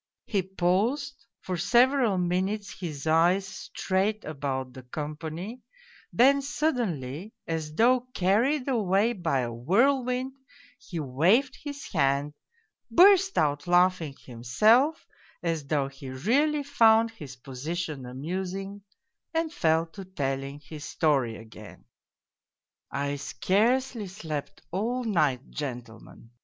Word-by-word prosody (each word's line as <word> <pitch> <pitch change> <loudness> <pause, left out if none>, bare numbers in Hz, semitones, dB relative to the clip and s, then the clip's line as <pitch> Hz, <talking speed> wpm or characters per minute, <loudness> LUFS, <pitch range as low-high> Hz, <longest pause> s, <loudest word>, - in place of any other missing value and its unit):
He 200 -3 0
paused, 210 +9 -1
for 185 -1 -3
several 245 0 +3
minutes 185 +3 -1
his 155 -6 -5
eyes 170 +5 +3
strayed 195 +2 -2
about 135 -4 -4
the 130 - -9
company, 155 - -6 0.5
then 275 +3 +5
suddenly, 220 - -2
as 160 -2 -4
though 250 +4 +3
carried 240 +10 +2
away 215 -2 +2
by 165 - 0
a 120 -1 -3
whirlwind, 250 - +1 0.5
he 175 - -6
waved 175 - +2
his 285 -1 -6
hand, 140 -2 +1 0.6
burst 385 +1 +6
out 145 0 +1
laughing 175 -4 +3
himself, 215 - +2 0.4
as 165 -4 -2
though 140 -2 +1
he 135 0 -10
really 280 - +1
found 230 -5 +4
his 145 - -10
position 140 +2 -5
amusing, 190 +9 -5 0.5
and 325 -1 0
fell 160 0 +2
to 195 +4 -10
telling 140 -5 -3
his 150 +1 -10
story 135 -10 +1
again. 110 -2 -13 0.6
" - - -65
I 140 +1 -2
scarcely 220 - 0
slept 160 -6 -6
all 235 +8 -1
night, 150 - 0
gentlemen. 120 -5 -8
180 Hz, 115 wpm, -27 LUFS, 145-235 Hz, 0.6 s, burst